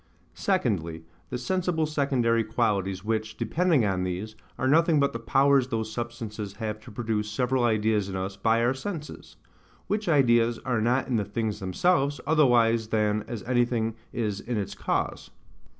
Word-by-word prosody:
Secondly, 90 - -1 0.3
the - - -3
sensible 175 +4 0
secondary 130 -6 +1
qualities, 100 -4 -1
which, 110 0 -2
depending 155 +2 +2
on 95 -2 0
these, 95 +4 -4 0.2
are 130 - 0
nothing 160 +2 +4
but 140 0 +2
the 115 - -4
powers 135 +2 +3
those 110 -3 -3
substances 115 -3 -5
have 110 +1 -4
to 115 - -13
produce 105 -1 -2
several 125 +3 0
ideas 110 -3 +1
in 95 - -5
us 95 +1 -3
by 115 +3 +2
our 120 +2 +3
senses; 150 +2 -7 0.5
which 210 -2 -1
ideas 120 -6 +4
are 120 -4 0
not 125 +3 +1
in 125 -3 +1
the 105 - 0
things 105 +1 -3
themselves, 140 - +1
otherwise 120 -7 +3
than 105 -1 +1
as 115 -4 -5
anything 120 -2 +1 0.2
is 105 -4 -2
in 120 +1 -3
its 100 -3 -3
cause. - - -2
115 Hz, 160 wpm, -27 LUFS, 105-135 Hz, 0.5 s, nothing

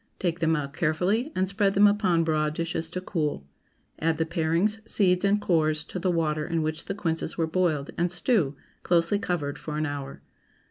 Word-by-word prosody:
Take 175 -2 -1
them 160 0 +2
out 140 -2 -3
carefully, 180 - 0
and 185 +1 +1
spread 195 0 +1
them 200 +1 +6
upon 195 -5 +3
broad 155 -1 0
dishes 165 -1 -3
to 185 +2 -4
cool. 150 - -2 0.5
Add 160 0 +1
the 160 - +1
parings, 170 +6 0
seeds, 180 -3 +3
and 200 +1 +3
cores, 155 -5 +1
to 180 - -6
the 185 - 0
water 155 -3 0
in 165 0 -1
which 155 0 -3
the 195 - -3
quinces 165 -4 -2
were 165 - +2
boiled, 160 -4 0
and 175 0 +1
stew, 175 - +1 0.3
closely 175 +3 +2
covered, 150 -8 -2
for 150 -1 -5
an 155 - 0
hour. 140 -2 -6
165 Hz, 190 wpm, -26 LUFS, 155-185 Hz, 0.5 s, them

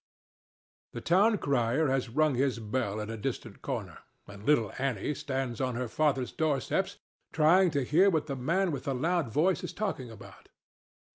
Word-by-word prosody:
The - - -5
town 205 +6 +4
crier 135 -1 +1
has 130 -2 0
rung 150 +4 +2
his 130 -1 +1
bell 110 -1 -2
at 105 +1 -4
a 115 - -5
distant 105 - -5
corner, - - -5 0.3
and 100 0 -12
little 115 -6 +2
Annie 135 0 -1
stands 135 -3 -3
on 130 -2 -1
her 125 +1 -2
father's 135 -1 0
doorsteps 150 -5 -1 0.3
trying 170 +4 +5
to 145 -3 0
hear 175 +10 +4
what 160 -5 0
the 140 - -4
man 170 +8 0
with 140 -4 -5
the 135 - -1
loud 165 -1 0
voice 170 - +2
is - - -5
talking 190 - -3
about. 110 -3 -13
135 Hz, 170 wpm, -29 LUFS, 120-160 Hz, 0.3 s, trying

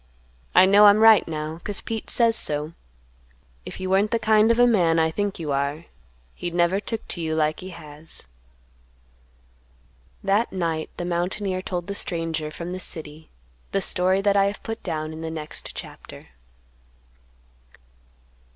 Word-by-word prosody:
I 185 - +8
know 205 +2 +7
I'm 205 0 +7
right 220 -1 +6
now, 155 +1 -5
'cause 205 -2 -3
Pete 225 -1 -5
says 230 -2 +4
so. 150 -2 0 0.9
If - - -7
you 185 - -4
weren't 195 +3 +2
the 230 - +1
kind 220 0 +3
of 230 - +3
a 245 - +6
man 175 -9 +3
I 160 0 +2
think 205 +3 -2
you 155 -4 -4
are, 140 +4 -2 0.5
he'd 175 - -5
never 175 +3 +2
took 225 +1 -5
to 170 - -5
you 160 -1 -2
like 155 -1 0
he 185 - -8
has." 155 - -9 2.0
That 200 +4 +1
night 165 -4 -2
the 175 - -4
mountaineer 185 +2 -2
told 180 -2 -4
the 200 - -4
stranger 165 -5 -2
from 170 +3 -7
the 185 - -5
city 155 -3 -5 0.4
the 195 - +2
story 185 0 +1
that 200 0 +2
I 195 -1 +4
have 200 +1 -3
put 225 -1 -5
down 155 -3 -4
in 160 - -8
the 165 - -4
next 155 -1 -7
chapter. - - -10
180 Hz, 160 wpm, -24 LUFS, 160-200 Hz, 2.0 s, I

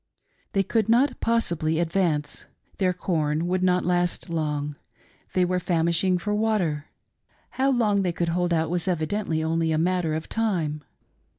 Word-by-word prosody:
They 195 - +2
could 220 +2 0
not 250 +4 +3
possibly 170 -9 0
advance. 165 -3 0 0.3
Their 185 -2 +3
corn 160 -3 -1
would 185 +1 0
not 180 0 +2
last 175 0 0
long. 150 -3 -2 0.6
They 180 -1 +3
were 180 0 0
famishing 170 +1 +1
for 210 +4 -2
water. 205 -9 0 0.6
How 265 +1 +1
long 215 -6 +2
they 180 -2 0
could 170 0 -1
hold 175 +1 0
out 165 -1 +1
was 175 -1 -1
evidently 165 -1 -1
only 165 0 0
a 155 - +1
matter 170 -1 +1
of 160 - -4
time. 170 -10 -1
175 Hz, 155 wpm, -25 LUFS, 160-195 Hz, 0.6 s, not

